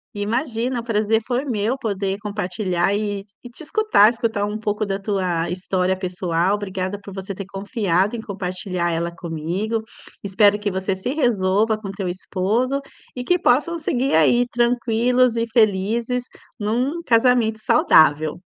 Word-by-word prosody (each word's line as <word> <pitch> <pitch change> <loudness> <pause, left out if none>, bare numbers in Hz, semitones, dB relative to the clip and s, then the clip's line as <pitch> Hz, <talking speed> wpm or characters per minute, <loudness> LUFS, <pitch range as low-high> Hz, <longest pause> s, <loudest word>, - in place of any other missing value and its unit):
Imagina, 235 +3 -1
o - - -6
prazer 220 -1 +1
foi 250 +2 -1
meu 230 -2 -1
poder 200 -6 -3
compartilhar 195 -2 -1
e 205 -1 -2 0.2
e 245 - -9
te 245 - -8
escutar, 315 - +4
escutar 225 -3 -1
um 210 +1 -4
pouco 210 0 -1
da 195 0 -2
tua 185 -5 -1
história 185 +1 -1
pessoal. 180 -1 -1
Obrigada 200 -1 -3
por 200 - -10
você 195 +1 -5
ter 195 0 -7
confiado 195 -1 -1
em 225 - -5
compartilhar 185 -3 -3
ela 170 +1 -2
comigo. 175 +6 -3 0.4
Espero 205 +1 +3
que 210 -1 -1
você 190 0 -2
se 190 +6 -4
resolva 215 -5 +1
com 205 - -8
o - - -4
teu 195 -2 -4
esposo, 210 +9 -1 0.4
e 250 - -4
que 360 +6 +2
possam 320 +6 +2
seguir 265 -3 -1
aí 240 +11 +4
tranquilos 240 0 +2
e 230 0 0
felizes 225 +3 +1 0.4
num 250 +10 -1
casamento 230 -3 +3
saudável. 155 - +4
210 Hz, 150 wpm, -21 LUFS, 190-235 Hz, 0.4 s, escutar